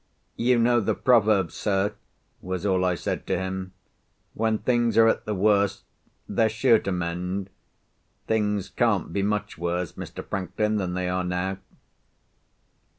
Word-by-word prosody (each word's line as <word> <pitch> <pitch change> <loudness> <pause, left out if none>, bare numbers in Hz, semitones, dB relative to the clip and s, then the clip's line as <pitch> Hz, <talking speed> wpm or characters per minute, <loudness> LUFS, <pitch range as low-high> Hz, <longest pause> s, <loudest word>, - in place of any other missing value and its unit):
"You 125 +1 +2
know 120 +1 +4
the - - 0
proverb, 105 -8 +3
sir," 100 0 0 0.5
was 95 +1 -4
all 95 -2 +2
I 90 -1 +2
said - - -4
to - - +1
him. 95 0 -4 0.6
"When 110 0 +1
things 120 +1 +1
are 115 0 +7
at 115 - +1
the 105 - -2
worst, 100 0 +2 0.4
they're 110 -1 +2
sure 115 +1 +4
to 100 - -3
mend. 90 +2 -3 0.7
Things 105 -3 0
can't 105 -9 0
be 100 - 0
much 105 -2 -2
worse, 85 0 -2
Mr. - - -8
Franklin, 105 +3 -1
than 90 -3 -2
they 90 0 -1
are 90 0 -1
now." 90 +2 -2
100 Hz, 150 wpm, -25 LUFS, 90-110 Hz, 0.7 s, are